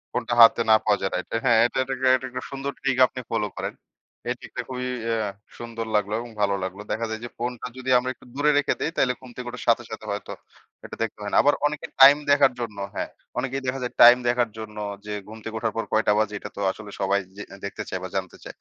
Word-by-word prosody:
ফোনটা 120 -1 -1
হাতে 115 +1 +8
না 110 - +8
পাওয়া 105 -2 +3
যায় 95 - -1
রাইট। 90 - -3 0.2
হ্যাঁ, 115 -3 +5
এটা 120 - -2
এটাকে 130 0 -1
একটা 130 0 -4
সুন্দর 135 +1 -3
ট্রিক 135 -2 0
আপনি - - -8
ফলো 105 -2 0
করেন। - - -3 0.6
এই 125 - 0
ট্রিকটা 125 - -6
খুবই 125 0 -3 0.2
অ্যা 110 -3 0 0.3
সুন্দর 115 -1 -5
লাগলো 105 0 +1
এবং 120 0 -7
ভালো 100 -1 +2
লাগলো। 95 +2 -5
দেখা 110 +2 -1
যায় 110 - -4
যে, 120 - -5
ফোনটা 120 0 -4
যদি 130 0 -5
আমরা 125 +1 -1
একটু - - -20
দূরে 150 +2 +3
রেখে 145 - +2
দেই 160 - -1
তাইলে 125 - +3
ঘুম 130 -1 -13
থেকে 125 -1 -7
ওঠার 125 0 -7
সাথে, 115 - +4
সাথে, - - -7
হয়তো - - -5 0.5
এটা - - -8
দেখতে 110 - -5
হয় 105 0 -4
না। - - +4
আবার 145 - +5
অনেকে 150 0 -5 0.2
টাইম 140 +2 +10
দেখার 140 -2 +5
জন্য 110 -4 -5 0.2
হ্যাঁ, - - -3 0.3
অনেকেই 135 +2 -2
দেখা 135 +1 -1
যায় 125 - -4
টাইম 120 +1 +10
দেখার 120 -1 +2
জন্য 110 -1 -8 0.3
যে 105 - -4
ঘুম 110 +1 -9
থেকে 110 0 -6
উঠার 110 -2 -1
পর 115 - 0
কয়টা 110 -1 +3
বাজে 110 -1 0
এটা - - -7
তো - - -3
আসলে 105 +1 -10
সবাই 100 +1 +2 0.2
যে 105 - -5 0.2
দেখতে 110 +2 -5
চায় 95 - -3
বা 95 - -5
জানতে 95 -2 -3
চায়। - - -9
120 Hz, 240 wpm, -25 LUFS, 105-130 Hz, 0.6 s, টাইম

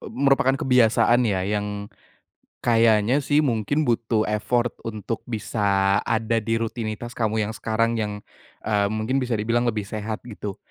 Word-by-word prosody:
e - - -10
merupakan 135 0 +2
kebiasaan 120 -2 +3
ya, 95 -2 0
yang 105 0 -3 0.7
kayaknya 115 +2 +4
sih 145 +2 +2
mungkin 135 +4 0
butuh 115 -3 +1
effort 120 +3 0 0.2
untuk 110 +1 -4
bisa 100 -3 +1
ada 115 0 0
di 115 +2 -1
rutinitas 115 0 -4
kamu 110 -2 0
yang 105 - -4
sekarang 115 +1 0
yang, 105 -1 -2 0.5
eee, 105 -2 +1
mungkin 110 +5 -1
bisa 125 -3 -1
dibilang 120 +3 0
lebih 105 -3 -1
sehat 110 +2 -5
gitu. 105 -4 -7
110 Hz, 145 wpm, -23 LUFS, 105-120 Hz, 0.7 s, kayaknya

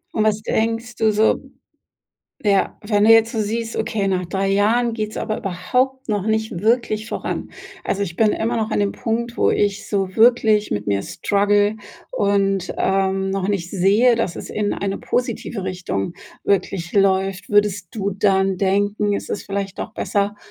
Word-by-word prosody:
Und 215 - +2
was 215 0 +1
denkst 230 +2 -1
du 220 -1 +2
so 215 +1 +3 1.1
ja, 200 -2 +2
wenn 205 -1 +1
du 220 - +5
jetzt 225 0 +5
so 225 - -1
siehst: 225 +2 -2
„Okay, 205 -3 -1
nach 185 -2 0
3 195 +2 -1
Jahren 225 +4 +2
geht's 215 -1 -4
aber 215 - -2
überhaupt 255 +8 -1
noch 205 -3 0
nicht 220 -4 -1
wirklich 220 0 +1
voran? - - -4 0.3
Also, 200 - -1
ich 170 -3 -7
bin 215 +4 +3
immer 230 +3 -1
noch 220 -1 -1
an - - 0
'nem 205 -1 +1
Punkt, 235 +1 -3
wo - - +3
ich 200 -1 0
so 195 -2 -1
wirklich 220 -2 +4
mit 105 - -2
mir 100 -1 0
struggle 205 +1 +1 0.4
und, 195 -2 +1
ähm, 195 0 +1
noch 195 0 -1
nicht 185 -4 -2
sehe, 205 +6 +4
dass 225 -6 -2
es - - -7
in 210 -1 -1
eine 195 0 -3
positive 240 -4 -2
Richtung 180 - -3 0.3
wirklich 185 -3 0
läuft.“ 195 -1 +1
Würdest 205 -3 +2
du 200 -2 -2
dann 195 -1 +2
denken, 205 +2 +1
es - - -7
ist - - -3
vielleicht 195 -1 -4
doch - - -5
besser 205 -1 -1
205 Hz, 175 wpm, -21 LUFS, 195-220 Hz, 1.1 s, du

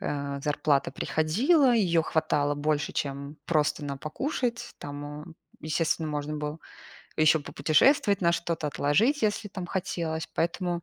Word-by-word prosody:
а, 140 -1 -3
зарплата 145 -1 +1
приходила, 245 - +2
её 170 -7 +3
хватало 145 -2 +1
больше, 150 0 -1
чем 140 +1 -4
просто 150 -2 +1
на 140 -1 -4
покушать. 240 - -3
Там, 145 0 -7
а, 150 +1 -7 0.4
естественно, 155 +1 0
можно 150 0 -3
было 150 +1 -4 0.6
ещё 155 0 +4
попутешествовать 195 - +3
на 170 0 +4
что-то, 170 -2 -2
отложить, 150 - +2
если 210 0 0
там 185 -2 -6
хотелось. 170 -3 -3
Поэтому, 175 +1 -1
155 Hz, 135 wpm, -27 LUFS, 145-180 Hz, 0.6 s, ещё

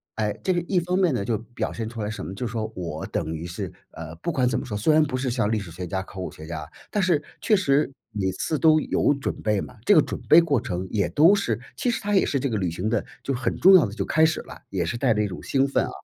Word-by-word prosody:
哎， 105 -1 0
这 185 - +2
个 175 - 0
一 185 - +2
方 180 +2 -1
面 180 -5 +3
呢， 100 -5 -1
就 115 - 0
表 115 +2 -5
现 110 -1 -4
出 115 -1 -7
来 105 - -2
什 105 - -5
么， 95 - -6
就 125 - -4
说 110 -1 -3
我 85 -4 -5
等 80 - -3
于 80 +2 -6
是 85 - -5 0.2
呃， 80 0 -8
不 130 - -3
管 130 -5 +1
怎 120 - 0
么 - - -6
说， 105 -4 -4
虽 110 +10 +3
然 155 0 +5
不 135 -4 -2
是 130 -1 -1
像 115 -4 0
历 110 - +1
史 95 -4 -8
学 90 +2 -6
家、 95 +3 -2
考 95 - -11
古 90 - -4
学 80 - -11
家， 80 -2 -5 0.2
但 210 - +1
是 170 -6 +2 0.2
确 220 - +3
实 145 -7 +2 0.2
每 95 -3 -1
次 150 +10 -2
都 155 -1 +5
有 145 - +1
准 140 - -3
备 105 -2 +1
嘛。 125 - -9
这 205 - +6
个 155 - +8
准 - - -5
备 160 - +9
过 145 -8 +1
程 90 +1 -4
也 100 -5 +1
都 165 +6 +6
是 200 -1 0 0.2
其 250 - -1
实 - - -2
它 205 0 -2
也 190 - +5
是 140 - 0
这 140 - -1
个 110 - -1
旅 90 -3 0
行 90 +5 -3
的 115 -3 0 0.2
就 135 - -1
很 130 0 -2
重 190 - +7
要 180 - +7
地 100 - -8
就 - - -2
开 160 - +2
始 160 - +1
了， - - -12
也 95 -3 -1
是 115 +9 -3
带 120 -1 +2
着 105 - +1
一 - - 0
种 90 - -7
兴 135 0 +2
奋 135 - +1
啊， - - -6
120 Hz, 325 characters per minute, -24 LUFS, 95-155 Hz, 0.2 s, 备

